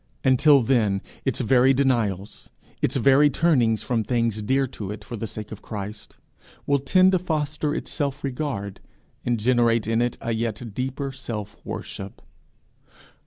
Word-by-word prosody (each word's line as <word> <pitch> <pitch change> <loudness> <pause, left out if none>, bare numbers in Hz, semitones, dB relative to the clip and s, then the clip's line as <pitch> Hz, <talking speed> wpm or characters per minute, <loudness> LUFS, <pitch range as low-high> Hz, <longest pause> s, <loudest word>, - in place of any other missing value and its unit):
Until 135 +1 +5
then, 110 -6 +1 0.2
its 135 -1 0
very 130 +2 +4
denials, 115 -8 -1 0.3
its - - +1
very 140 +2 +5
turnings 130 -8 +2
from 115 -3 0
things 115 -2 0
dear 135 +6 +1
to 105 -6 -7
it 105 0 -6
for 120 - -7
the 115 0 -4
sake 105 0 -7
of 110 - -8
Christ, 105 0 -7 0.5
will 140 0 +2
tend 185 +7 +4
to 185 - +2
foster 150 -3 -1
its - - -5
self 145 -2 -2
regard, 125 -8 -3 0.5
and 120 -2 +1
generate 115 -1 +2
in 115 +1 +1
it 120 0 -1
a 115 - -3
yet 115 0 -3
deeper 135 +3 -3
self 110 -6 -7
worship. 95 0 -7
120 Hz, 155 wpm, -24 LUFS, 110-140 Hz, 0.5 s, Until